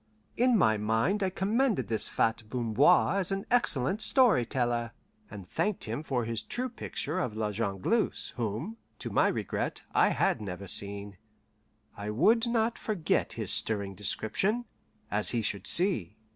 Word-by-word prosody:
In 245 Hz, -1 st, +3 dB
my 110 Hz, -, +3 dB
mind 110 Hz, -, +1 dB
I 190 Hz, -, +1 dB
commended 200 Hz, -, 0 dB
this 110 Hz, 0 st, +3 dB
fat 115 Hz, 0 st, 0 dB
Bamboir 125 Hz, -, +3 dB
as 190 Hz, 0 st, -1 dB
an 195 Hz, 0 st, -2 dB
excellent 200 Hz, -, +2 dB
story 215 Hz, -, +4 dB
teller, 120 Hz, -3 st, -1 dB, 0.4 s
and 100 Hz, -4 st, -10 dB
thanked 210 Hz, -, -1 dB
him -, -, -4 dB
for 130 Hz, -6 st, -2 dB
his 115 Hz, -1 st, -2 dB
true 255 Hz, -, -3 dB
picture 185 Hz, -, -4 dB
of 115 Hz, -11 st, -3 dB
La 105 Hz, -1 st, -1 dB
Jongleuse, 105 Hz, -, -1 dB
whom, 120 Hz, -, -4 dB, 0.2 s
to -, -, -6 dB
my -, -, +3 dB
regret, -, -, -3 dB
I -, -, +4 dB
had -, -, +1 dB
never 100 Hz, -1 st, -6 dB
seen. 100 Hz, +1 st, -3 dB, 0.8 s
I 100 Hz, +1 st, -6 dB
would 220 Hz, -, +3 dB
not 235 Hz, 0 st, 0 dB
forget 200 Hz, -8 st, -1 dB
his -, -, 0 dB
stirring 100 Hz, -3 st, 0 dB
description, 110 Hz, -, 0 dB, 0.5 s
as 105 Hz, +1 st, 0 dB
he 115 Hz, -2 st, -1 dB
should 100 Hz, -1 st, -2 dB
see. 145 Hz, -, +3 dB
125 Hz, 155 wpm, -29 LUFS, -, 0.8 s, story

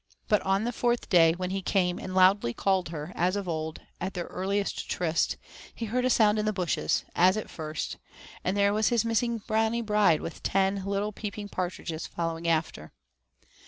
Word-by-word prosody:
But 210 Hz, -2 st, +3 dB
on 195 Hz, +2 st, +1 dB
the 240 Hz, -, -1 dB
fourth 240 Hz, 0 st, 0 dB
day, 165 Hz, -3 st, +6 dB
when 180 Hz, +1 st, -4 dB
he 195 Hz, 0 st, -2 dB
came 180 Hz, -1 st, +1 dB
and 185 Hz, -, -6 dB
loudly 185 Hz, -, +4 dB
called 190 Hz, -3 st, +1 dB
her, 155 Hz, 0 st, -6 dB
as 180 Hz, +2 st, +1 dB
of 200 Hz, -2 st, -3 dB
old, 160 Hz, -1 st, -3 dB, 0.2 s
at 190 Hz, +2 st, -4 dB
their 175 Hz, -1 st, -3 dB
earliest 200 Hz, +2 st, -2 dB
tryst, 165 Hz, -2 st, 0 dB, 0.4 s
he 230 Hz, -, -4 dB
heard 250 Hz, +4 st, 0 dB
a -, -, +3 dB
sound 215 Hz, -3 st, +4 dB
in 210 Hz, -, 0 dB
the 215 Hz, -, +2 dB
bushes, 185 Hz, -4 st, 0 dB
as 185 Hz, +3 st, +5 dB
at 215 Hz, -, -5 dB
first, 155 Hz, -1 st, -4 dB, 0.5 s
and 185 Hz, +3 st, 0 dB
there 200 Hz, 0 st, +3 dB
was 215 Hz, +1 st, +2 dB
his 235 Hz, -1 st, +2 dB
missing 230 Hz, -1 st, 0 dB
Brownie 225 Hz, +1 st, +1 dB
bride 210 Hz, -7 st, +3 dB
with 165 Hz, -, -7 dB
ten 195 Hz, 0 st, +1 dB
little 200 Hz, +1 st, -1 dB
peeping 205 Hz, 0 st, -6 dB
partridges 175 Hz, -3 st, -4 dB
following 165 Hz, 0 st, -3 dB
after. 160 Hz, -, -1 dB
195 Hz, 190 wpm, -28 LUFS, 175-210 Hz, 0.5 s, day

